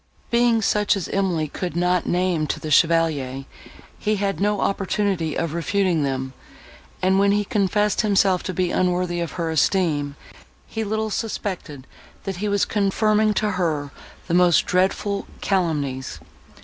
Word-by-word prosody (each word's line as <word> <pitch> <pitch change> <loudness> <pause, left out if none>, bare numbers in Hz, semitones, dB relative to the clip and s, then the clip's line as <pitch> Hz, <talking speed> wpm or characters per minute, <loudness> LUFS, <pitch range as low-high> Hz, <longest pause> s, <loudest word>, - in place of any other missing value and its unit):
Being 235 -1 +3
such 210 0 +2
as 190 - -4
Emily 180 -6 0
could 175 +4 -5
not 180 0 +1
name 175 -3 +1
to - - -2
the 155 - -6
Chevalier, 150 -5 +2 0.5
he 215 0 0
had 195 -1 -2
no 205 +1 +1
opportunity 195 -4 -1
of 165 -2 -2
refuting 175 0 +1
them; 130 -1 -2 0.7
and, 190 +1 +3
when 200 0 +4
he 205 0 +1
confessed 205 +1 +1
himself 195 -4 +2
to 185 - -3
be 180 0 0
unworthy 180 -1 0
of 170 -1 -3
her 165 -2 -2
esteem, 150 -3 +1 0.5
he 220 - -4
little 220 +1 -2
suspected, 185 - -4 0.4
that 195 -2 -4
he 210 +3 -2
was 200 -1 +2
confirming 215 +1 +1
to 210 -1 +1
her 160 -7 -1 0.3
the 170 - -3
most 175 -2 +4
dreadful 195 +2 0
calumnies. 145 -8 -1
185 Hz, 150 wpm, -22 LUFS, 165-205 Hz, 0.7 s, when